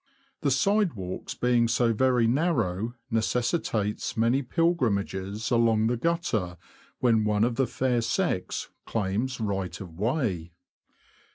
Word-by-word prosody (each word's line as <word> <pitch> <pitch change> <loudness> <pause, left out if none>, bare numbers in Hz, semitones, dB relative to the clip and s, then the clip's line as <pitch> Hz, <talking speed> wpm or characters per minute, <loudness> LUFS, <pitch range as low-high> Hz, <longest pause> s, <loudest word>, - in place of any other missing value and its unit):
The 145 - +1
side 195 +7 +2
walks 95 -3 -6
being 120 -1 +2
so 115 0 +2
very 125 +1 +3
narrow 115 - 0 0.2
neces 115 +2 +1
sitates 105 -13 -2
many 115 +4 +3
pilgrimages 110 - 0
along 115 -2 +3
the 120 +2 +2
gutter 115 - -1 0.4
when 115 -3 +3
one 105 0 +2
of 120 +1 +2
the 130 +1 +1
fair 125 -2 0
sex 115 - -1 0.2
claims 115 +5 -1
right 95 -5 -2
of 85 -3 -10
way. 105 - -1
115 Hz, 125 wpm, -27 LUFS, 100-130 Hz, 0.4 s, very